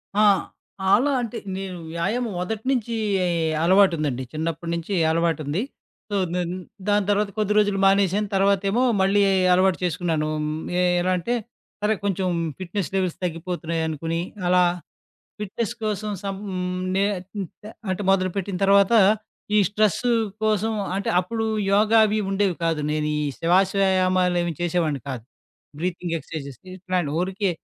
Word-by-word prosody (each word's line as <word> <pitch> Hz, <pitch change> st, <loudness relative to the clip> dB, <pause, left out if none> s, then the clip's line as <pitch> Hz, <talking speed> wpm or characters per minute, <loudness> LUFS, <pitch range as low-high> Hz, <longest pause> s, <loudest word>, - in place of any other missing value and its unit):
ఆ! -, -, +2 dB, 0.7 s
అలా 275 Hz, +6 st, +4 dB
అంటే, 235 Hz, 0 st, -4 dB, 0.2 s
నేను 190 Hz, -2 st, -5 dB, 0.2 s
వ్యాయామం. 215 Hz, +7 st, -1 dB
మొదటి 220 Hz, +5 st, -4 dB
నుంచి 235 Hz, -2 st, -1 dB, 0.7 s
అలవాటుందండి. 165 Hz, -8 st, +3 dB
చిన్నప్పటి 165 Hz, +2 st, -3 dB
నుంచి 170 Hz, +4 st, -4 dB, 0.2 s
అలవాటుంది. 165 Hz, 0 st, 0 dB, 0.5 s
సో, 205 Hz, -, 0 dB, 0.2 s
నేన్ 175 Hz, -1 st, -1 dB, 0.4 s
దాని 205 Hz, -1 st, +3 dB
తర్వాత, 205 Hz, 0 st, +2 dB
కొద్ది 210 Hz, -1 st, +1 dB
రోజులు 205 Hz, -2 st, +3 dB
మానేసాను. 195 Hz, +1 st, +3 dB
తర్వాతేమో 200 Hz, +4 st, +2 dB, 0.2 s
మళ్ళీ, 200 Hz, +2 st, +3 dB, 0.3 s
అలవాటు 185 Hz, 0 st, +3 dB
చేసుకున్నాను. 165 Hz, -3 st, 0 dB
ఆహ్, 150 Hz, 0 st, -2 dB, 0.3 s
ఎ -, -, +3 dB, 0.2 s
ఎలా 185 Hz, +1 st, +1 dB
అంటే, 180 Hz, +8 st, -2 dB, 0.5 s
సరే 210 Hz, +1 st, +2 dB
కొంచెం 195 Hz, -2 st, 0 dB, 0.3 s
ఫిట్నెస్ 185 Hz, 0 st, -3 dB
లెవెల్స్ 185 Hz, -3 st, 0 dB
తగ్గిపోతున్నాయనుకోని, 165 Hz, -1 st, -2 dB, 0.3 s
అలా 180 Hz, 0 st, +5 dB, 0.8 s
ఫిట్నెస్ 210 Hz, +3 st, -3 dB
కోసం, 215 Hz, 0 st, -2 dB
సం 195 Hz, -1 st, -3 dB
హ్మ్. 180 Hz, 0 st, -3 dB
నే 195 Hz, -, +3 dB, 0.3 s
హ్మ్. 195 Hz, -3 st, -3 dB, 0.2 s
తే 210 Hz, -, -8 dB, 0.2 s
అంటే 185 Hz, +2 st, -1 dB
మొదలుపెట్టిన 185 Hz, 0 st, 0 dB
తర్వాత, 200 Hz, +3 st, +5 dB, 0.6 s
ఈ -, -, +6 dB
స్ట్రెస్సు 215 Hz, +3 st, +1 dB, 0.3 s
కోసం 215 Hz, +1 st, +1 dB, 0.2 s
అంటే, 200 Hz, -, -2 dB
అప్పుడు 225 Hz, +5 st, -2 dB, 0.3 s
యోగా 215 Hz, +2 st, +5 dB
అవి 215 Hz, +1 st, 0 dB
ఉండేవి 195 Hz, -2 st, +1 dB
కాదు. 165 Hz, -2 st, +1 dB
నేను 150 Hz, 0 st, -1 dB
ఈ -, -, -1 dB, 0.2 s
శివాశయామాలేవి 185 Hz, -1 st, +2 dB
చేసేవాడిని 165 Hz, -5 st, 0 dB
కాదు. 125 Hz, -4 st, -5 dB, 0.6 s
బ్రీతింగ్ 175 Hz, -1 st, -3 dB
ఎక్సర్‌సైజేస్ 140 Hz, -4 st, -8 dB, 0.2 s
ఇట్లాంటివి. 180 Hz, -5 st, -2 dB
ఊరికే, 190 Hz, +1 st, -1 dB
185 Hz, 130 wpm, -23 LUFS, 170-205 Hz, 0.8 s, ఈ